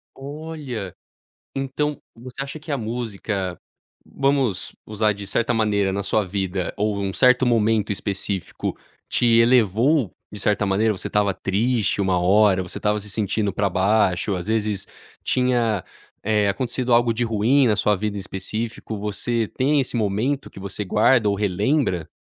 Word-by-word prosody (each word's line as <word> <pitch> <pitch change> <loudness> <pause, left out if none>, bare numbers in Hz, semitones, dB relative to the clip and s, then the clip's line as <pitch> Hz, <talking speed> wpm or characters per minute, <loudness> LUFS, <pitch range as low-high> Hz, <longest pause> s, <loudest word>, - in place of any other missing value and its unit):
Olha, 140 - -6 0.6
então, 135 +2 -2
você 125 +3 -7
acha 140 +3 -6
que 155 0 -7
a - - +1
música 110 -5 -3 0.5
vamos 135 -8 0
usar 105 0 +1
de 100 0 -8
certa 115 +5 0
maneira 105 -3 +1
na 100 +1 -2
sua 105 +2 +1
vida 95 -1 -2
ou 105 0 0
um 100 -1 -2
certo 125 +3 +4
momento 110 -3 +2
específico 100 -2 -3 0.3
te 120 - +1
elevou 115 - +4 0.2
de 105 - -7
certa 105 +1 +1
maneira? 105 +3 +2
Você - - -6
estava 100 -2 +1
triste 105 +3 0
uma 95 -2 +2
hora, 95 +1 +4
você 90 - -6
estava 105 0 +1
se 105 0 -7
sentindo 105 0 -1
pra 100 +1 +1
baixo, 95 0 +2
às 90 -1 -4
vezes 105 -3 -1 0.4
tinha, 120 -6 +1 0.4
eh, 105 -1 +2
acontecido 125 +4 -1
algo 120 0 +4
de 115 +2 -2
ruim 120 +5 +3
na 105 - +2
sua 105 0 +3
vida 105 +1 -3
em - - -3
específico? 110 +3 -5
Você 110 +3 -1
tem 140 +6 +1
esse 130 -2 -2
momento 115 +6 -1
que - - -12
você 100 +2 -5
guarda 105 +3 +3
ou 100 - +2
relembra? 100 - 0
105 Hz, 155 wpm, -22 LUFS, 100-120 Hz, 0.6 s, certo